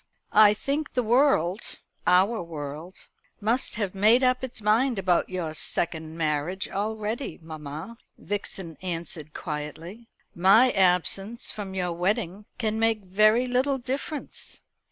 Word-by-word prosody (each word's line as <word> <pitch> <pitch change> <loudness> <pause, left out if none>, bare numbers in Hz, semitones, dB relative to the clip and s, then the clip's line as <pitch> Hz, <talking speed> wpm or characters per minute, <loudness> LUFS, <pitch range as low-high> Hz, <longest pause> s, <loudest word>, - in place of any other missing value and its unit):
"I 210 0 +7
think 285 +7 -2
the 250 - +1
world 220 - +2 0.3
our 195 +5 +4
world 160 +2 -8 0.3
must 230 +4 +1
have 205 -4 -2
made 215 +6 +4
up 255 0 +2
its 260 -3 -4
mind 220 +4 +2
about 185 -2 +1
your 175 -4 -3
second 160 0 -2
marriage 155 +4 -1
already, 215 +5 -3
mamma," 160 +6 -8 0.2
Vixen 190 -4 -4
answered 165 -4 -4
quietly. 160 +8 -6 0.3
"My 200 +8 +5
absence 195 +4 +1
from 200 -3 -6
your 180 -2 -1
wedding 195 +2 -1
can 220 -2 -1
make 225 -2 +1
very 215 +6 +4
little 255 +2 +1
difference." 270 +4 -5
200 Hz, 125 wpm, -26 LUFS, 170-230 Hz, 0.3 s, I